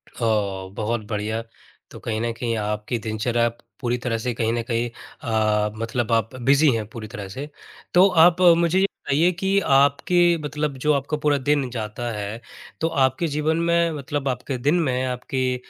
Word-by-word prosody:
अ, - - -11 0.5
बहुत 110 +1 -2
बढ़िया। 110 +1 -2 0.5
तो - - -10
कहीं 110 -1 -3
न 120 0 -1
कहीं 115 -2 -1
आपकी 105 +2 -2
दिनचर्या 115 +2 0 0.3
पूरी 120 -1 0
तरह 115 -2 0
से 120 +2 -2
कहीं 115 0 0
न 120 - 0
कहीं 120 0 0
अ, 110 -2 -1
मतलब 115 +1 -2
आप 115 +2 +1
बिज़ी 140 +4 +4
हैं, 110 -1 -2
पूरी 110 0 -8
तरह 100 -1 -7
से। 135 +9 -6 0.4
तो 180 +2 +7
आप 175 0 +5 0.2
मुझे 170 +2 +2
ये 195 - +4
बताइए 165 -2 +1
कि 195 +2 +1
आपके 155 +6 +4
मतलब 150 -1 -3
जो 150 - +5
आपका 140 +2 -1
पूरा 150 -1 +2
दिन 140 -1 0
जाता 115 0 -4
है, 105 +1 -5 0.4
तो 165 - +2
आपके 135 0 +1
जीवन 150 +2 0
में, 170 0 +2
मतलब 145 -1 -4
आपके 130 +1 -3
दिन 145 +7 +1
में, 130 -3 0
आपकी 130 0 -2
130 Hz, 175 wpm, -23 LUFS, 115-150 Hz, 0.5 s, तो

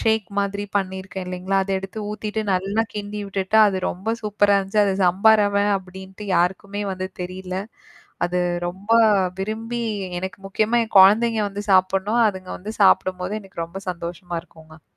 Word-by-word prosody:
ஷேக் 220 -3 +1
மாதிரி 200 0 -1
பண்ணியிருக்கேன், 190 -1 -3
இல்லைங்களா? 180 +2 -2
அத 195 - -5
எடுத்து 195 +3 -8
ஊத்திட்டு 215 +1 -3
நல்லா 195 +4 0
கிண்டி 210 0 -5
விட்டுட்டா, 195 +2 +1
அது 195 - -2
ரொம்ப 220 +6 -2
சூப்பரா 205 -1 +2
இருந்துச்சு. 195 +2 +1
அத 200 - +1
சம்பா 190 +5 +5
ரவே 200 0 +2
அப்படின்ட்டு 190 +2 -11
யாருக்குமே 190 +4 0
வந்து 185 0 -4
தெரில. 185 +1 -6 0.7
அது 180 +1 -1 0.3
ரொம்ப 190 +4 -9 0.5
விரும்பி 225 +4 -3 0.4
எனக்கு 190 +2 -6
முக்கியமா 215 +4 +1
என் 220 - -16
குழந்தைங்க 220 +3 +5
வந்து 205 +1 -6
சாப்பிடணும். 190 +4 +3
அதுங்க 185 -2 -9
வந்து 210 +4 -7
சாப்பிடும்போது 185 0 +3
எனக்கு 185 -4 -6
ரொம்ப 190 +4 -9
சந்தோஷமா 175 0 -6
இருக்குங்க. 160 -2 -17
195 Hz, 150 wpm, -22 LUFS, 185-210 Hz, 0.7 s, சம்பா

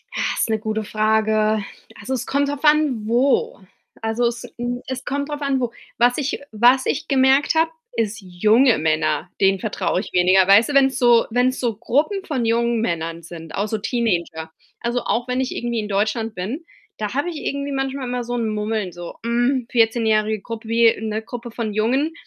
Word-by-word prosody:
Ah, - - 0
ist - - 0
'ne 220 -1 +1
gute 220 0 -2
Frage. 215 0 +1 0.4
Also, 215 +6 -4
es 255 - -2
kommt 280 +1 0
drauf 290 0 -5
an 295 -8 +3
wo. 280 - +1 0.4
Also, 225 +2 0
es 240 +1 -4
hm, 245 +1 -3
es 260 0 -5
kommt 280 +1 -2
drauf 295 0 -5
an 275 -2 0
wo. 245 -2 -2 0.3
Was 245 +1 +3
ich 290 -1 -2
was 245 +4 +4
ich 305 +3 -2
gemerkt 270 +2 +3
habe, 325 0 +3 0.2
ist 225 -1 -1
junge 215 +7 +3
Männer, 155 +2 0
denen 195 0 +3
vertraue 195 -5 -1
ich 195 - -6
weniger. 185 +1 +4
Weißt 215 +6 +6
du, - - -2
wenn's 270 -1 +4
so 240 -2 +5
wenn's 250 +3 +1
so 235 -4 -1
Gruppen 315 - 0
von 265 - -2
jungen 235 0 +1
Männern 165 -4 -2
sind, 165 -1 -10
auch 200 +2 -1
so 220 - -2
Teenager. 175 -8 -2 0.3
Also, 240 0 -1
auch 240 +2 -1
wenn 250 +1 0
ich 260 - -3
irgendwie 240 -1 -2
in 210 -1 -4
Deutschland 215 +3 -1
bin, 230 - -5 0.3
da 210 0 -3
habe 285 +6 -1
ich 330 - -6
irgendwie 280 0 -2
manchmal 270 -1 -3
immer 245 0 -2
so 240 +1 -5
'n 230 -2 -1
Mummeln, 210 -2 -2
so: 175 0 -9
Hm, 240 +2 +1
Vierzehnjährige 220 -2 +2
Grup 230 +1 -7
wie 230 0 +4
'ne 220 0 -3
Gruppe 235 +1 -8
von 225 -2 -4
Jungen. 260 +9 +1
230 Hz, 195 wpm, -21 LUFS, 215-260 Hz, 0.4 s, Weißt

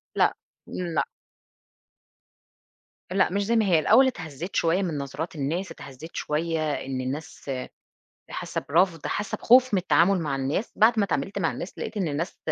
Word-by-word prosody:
لأ. - - +4 0.3
لأ. 170 -3 -1 2.1
لأ، 190 0 +3
مش 200 +1 0
زي 235 - +1
ما 220 -2 +3
هي. 170 -4 +4
الأول 255 +11 +6
إتهزّيت 165 - -5
شويّة 170 +4 +2
من 170 -6 -2
نظرات 150 +4 -5
الناس، 160 +7 -2
إتهزّيت 140 +5 -10
شويّة 155 0 -1
إن 130 -1 -3
الناس 140 +1 -5 0.8
حاسّة - - -3
برفض، 165 0 +2
حاسة 205 - -2
بخوف 255 -1 +5
من 190 - +3
التعامل 180 +1 +3
مع 145 -4 -1
الناس، 135 - -2
بعد 220 +1 +5
ما 200 - +4
إتعاملت 195 +2 -2
مع 165 -4 +1
الناس، 180 - -7
لقيت 215 - -5
إن 190 -5 0
الناس 155 +4 -3
170 Hz, 160 wpm, -26 LUFS, 150-195 Hz, 2.1 s, الأول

